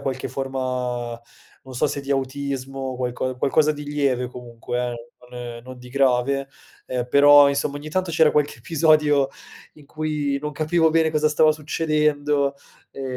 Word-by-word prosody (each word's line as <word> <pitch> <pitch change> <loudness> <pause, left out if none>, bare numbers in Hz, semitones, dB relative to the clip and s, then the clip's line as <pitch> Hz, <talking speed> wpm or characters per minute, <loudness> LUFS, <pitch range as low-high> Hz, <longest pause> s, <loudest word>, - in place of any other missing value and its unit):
aveva - - -14
qualche 130 -1 -3
forma 125 -3 -3 0.4
non 130 -1 -11
so 125 - +1
se 145 0 -3
di 140 0 -8
autismo, 135 -1 -3
qualco 125 0 -3
qualcosa 150 +4 +2
di 150 0 -8
lieve 140 -4 0
comunque, 120 -1 -6
eh, 120 0 -9 0.2
non 120 -1 -8
non 130 0 -11
di 125 - -12
grave, 135 +1 +1 0.4
eh, 125 -1 -3
però 145 +2 +7
insomma 140 +1 -1
ogni 145 +1 -8
tanto 185 +1 -1
c'era 160 -1 +4
qualche 145 -5 0
episodio 150 -1 +3 0.5
in 150 -2 -18
cui 150 -2 -2
non 150 +1 -4
capivo 160 +2 +2
bene 160 0 +2
cosa 155 0 +2
stava 155 +1 +4
succedendo, 150 -2 0 0.3
ehm, 135 - -8
140 Hz, 160 wpm, -22 LUFS, 130-150 Hz, 0.5 s, però